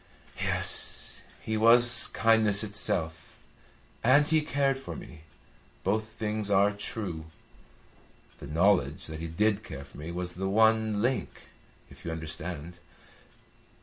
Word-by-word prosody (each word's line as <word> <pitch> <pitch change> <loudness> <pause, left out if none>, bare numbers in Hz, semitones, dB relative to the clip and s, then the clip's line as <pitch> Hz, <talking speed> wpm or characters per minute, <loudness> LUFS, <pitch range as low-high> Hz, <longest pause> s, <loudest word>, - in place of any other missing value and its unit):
"Yes. - - +1 0.2
He 110 0 -2
was 120 +1 +5
kindness 110 -2 +3
itself, 95 -6 -3 0.7
and 140 +5 +5
he 155 0 +3
cared 140 -2 0
for 135 - -7
me. 75 - -11 0.6
Both 110 +3 0
things 110 -1 -4
are 100 +1 +4
true. 100 -5 -4 1.1
The - - -9
knowledge 90 +6 +2
that 80 0 -7
he 85 - -4
did 105 +5 0
care 70 -11 -8
for 70 - -14
me 80 +3 -6
was 90 +1 -3
the 95 +2 -3
one 110 0 +3
link, 130 +1 -2 0.5
if - - -15
you 85 - -5
understand. 80 +1 -6
105 Hz, 125 wpm, -28 LUFS, 85-110 Hz, 1.1 s, was